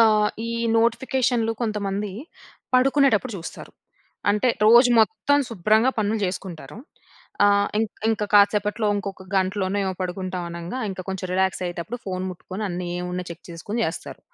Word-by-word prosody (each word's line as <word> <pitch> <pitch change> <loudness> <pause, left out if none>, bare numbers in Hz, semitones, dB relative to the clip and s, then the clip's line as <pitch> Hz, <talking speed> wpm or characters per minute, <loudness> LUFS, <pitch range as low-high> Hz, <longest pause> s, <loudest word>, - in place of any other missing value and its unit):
ఆహ్, 215 -2 +5 0.2
ఈ - - -3 0.3
నోటిఫికేషన్లు 235 0 +1
కొంతమంది 205 -2 -2 0.6
పడుకునేటప్పుడు 260 -3 +3
జూస్తారు. 165 - -9 0.6
అంటే 210 +5 +2 0.2
రోజు 240 +3 +7
మొత్తం 285 +5 +2
శుభ్రంగా 220 +4 +3
పనులు 215 +1 +1
జేసుకుంటారు. 180 -5 -5 0.7
ఆహ్, 200 0 +4
ఇంక్ 220 -1 -3
ఇంక 220 -1 +1
కాసేపట్లో 210 +1 +4
ఇంకొక 195 -2 -5
గంటలోనే 190 +1 0
ఏమొ 190 -1 -2
పడుకుంటామనంగా 180 +1 -4
ఇంకా 185 -1 -6
కొంచెం 190 -1 -3
రిలాక్స్ 190 0 +1
అయ్యేటప్పుడు 175 +7 -4
ఫోన్ 185 -1 -3
ముట్టుకొని 185 +3 -7
అన్నీ 180 0 -4
ఏమున్నా 180 0 -4
చెక్ 170 +1 -9
చేసుకొని 205 +8 -3
జేస్తారు. 165 - -5
205 Hz, 130 wpm, -23 LUFS, 185-225 Hz, 0.7 s, రోజు